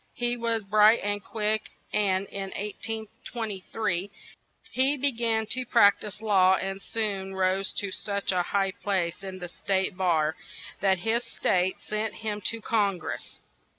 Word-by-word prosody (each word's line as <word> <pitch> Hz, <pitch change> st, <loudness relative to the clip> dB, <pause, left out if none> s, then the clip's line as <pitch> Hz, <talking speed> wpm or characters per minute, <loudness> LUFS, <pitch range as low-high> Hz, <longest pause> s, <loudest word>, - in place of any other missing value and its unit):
He 240 Hz, 0 st, +1 dB
was 230 Hz, -2 st, 0 dB
bright 210 Hz, +3 st, +6 dB
and 205 Hz, 0 st, -1 dB
quick, 215 Hz, 0 st, -1 dB, 0.2 s
and, 195 Hz, -2 st, +2 dB
in 195 Hz, -1 st, -4 dB
1823, 210 Hz, -2 st, -3 dB, 0.6 s
he 270 Hz, +3 st, +3 dB
be 280 Hz, +1 st, +2 dB
gan 225 Hz, -2 st, 0 dB
to 255 Hz, -, 0 dB
prac 230 Hz, -5 st, +5 dB
tise 210 Hz, +1 st, -8 dB
law 190 Hz, -3 st, +5 dB
and 195 Hz, +1 st, -4 dB
soon 195 Hz, -4 st, -2 dB
rose 190 Hz, 0 st, +1 dB
to 200 Hz, -1 st, -2 dB
such 200 Hz, +1 st, -2 dB
a 180 Hz, -1 st, +2 dB
high 195 Hz, +2 st, 0 dB
place 190 Hz, -3 st, -2 dB
in 190 Hz, -1 st, -6 dB
the 180 Hz, -1 st, -6 dB
state 190 Hz, +1 st, -1 dB
bar 160 Hz, -4 st, +2 dB, 0.4 s
that 190 Hz, -1 st, +3 dB
his 230 Hz, +2 st, +2 dB
state 185 Hz, -4 st, +1 dB
sent 215 Hz, 0 st, -3 dB
him 210 Hz, -1 st, -4 dB
to 230 Hz, 0 st, 0 dB
Con 205 Hz, -4 st, +1 dB
gress. 165 Hz, -, -6 dB
205 Hz, 150 wpm, -27 LUFS, 190-220 Hz, 0.6 s, bright